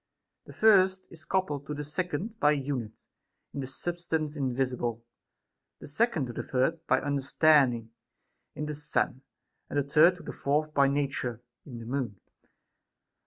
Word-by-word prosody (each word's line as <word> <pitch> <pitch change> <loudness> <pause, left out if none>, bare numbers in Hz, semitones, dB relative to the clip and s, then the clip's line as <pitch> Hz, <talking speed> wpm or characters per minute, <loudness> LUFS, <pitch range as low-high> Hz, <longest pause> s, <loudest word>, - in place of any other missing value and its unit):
The - - -12
first 190 -3 +4
is 160 -2 -11
coupled 150 -7 -1
to 150 - -3
the 150 - -4
second 180 +7 -3
by 150 +1 +5
a - - +1
unit, 130 -6 -4 0.5
in - - -5
the 135 - -3
substance 160 +1 -3
invisible; 125 -4 -2 0.7
the - - -10
second 175 - +1
to 120 - -7
the - - -3
third 135 +6 0
by - - +4
understanding, 140 -4 +3 0.6
in 150 - -3
the 150 - -3
Sun; 145 -3 -1 0.5
and - - -3
the 145 - +3
third 155 +6 +5
to 180 - -13
the - - -6
fourth 150 +2 0
by 140 -1 +4
nature, 135 -4 -2 0.2
in 125 -4 -8
the 115 - -8
Moon. 120 -6 -3
145 Hz, 160 wpm, -29 LUFS, 130-160 Hz, 0.7 s, by